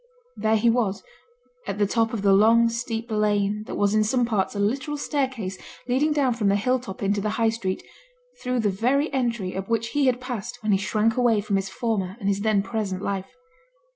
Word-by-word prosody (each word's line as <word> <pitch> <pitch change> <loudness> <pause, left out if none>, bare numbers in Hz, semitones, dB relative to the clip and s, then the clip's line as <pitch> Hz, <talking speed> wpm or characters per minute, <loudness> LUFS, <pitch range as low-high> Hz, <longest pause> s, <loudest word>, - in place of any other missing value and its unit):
There 220 0 +1
he 220 +2 +2
was, 225 -5 0 0.6
at - - -3
the 205 - +3
top 225 +2 +1
of 220 -4 -3
the 200 -1 +5
long, 230 +3 +5
steep 230 0 -4
lane 210 0 +1
that - - -5
was 205 0 +2
in 215 0 +4
some 245 +3 +1
parts 210 -4 -1
a - - -3
literal 260 +8 -1
staircase 260 -10 -2 0.3
leading 270 +5 +2
down 280 -4 +2
from 225 -3 -1
the 200 - +3
hill 250 +5 +1
top 210 -5 -8
into 200 +1 +1
the 215 - -1
High 225 -1 +3
Street, 205 -4 -3 0.6
through 250 -1 0
the 210 -2 +1
very 260 +9 +1
entry 235 -8 -1
up 190 +2 -5
which 230 0 0
he 285 +1 +1
had 250 -1 +2
passed 245 -2 -5
when 215 - +1
he 195 - +3
shrank 215 +3 +1
away 240 -4 +3
from 205 0 -1
his 195 0 -1
former 195 -2 -2
and 195 - -3
his 200 0 +1
then 210 -2 +2
present 200 -3 -3
life. 195 -1 -3
220 Hz, 215 wpm, -24 LUFS, 200-245 Hz, 0.6 s, the